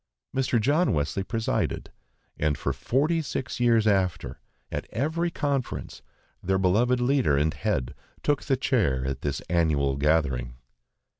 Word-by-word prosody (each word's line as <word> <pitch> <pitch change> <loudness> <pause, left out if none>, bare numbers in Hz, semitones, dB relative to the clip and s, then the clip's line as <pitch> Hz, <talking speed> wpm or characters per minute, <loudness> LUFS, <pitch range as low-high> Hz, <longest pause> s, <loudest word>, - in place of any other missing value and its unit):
Mr. 130 -3 +2
John 150 +10 +2
Wesley 75 +6 -1
presided, 115 +2 -2 0.4
and 75 -2 0
for - - -1
forty 155 +6 +1
six 130 -6 -4
years 115 -2 +4
after, 95 -5 0 0.3
at - - -4
every 160 - -1
conference, 140 -6 -3 0.4
their 95 +1 +1
beloved 110 +7 +2
leader 125 - +2
and 75 +3 +1
head 65 -4 -2 0.3
took 145 -1 +1
the 135 - +1
chair 85 - +1
at 65 0 -3
this 70 -2 -2
annual 75 -5 +1
gathering. 70 -5 +1
100 Hz, 135 wpm, -26 LUFS, -, 0.4 s, years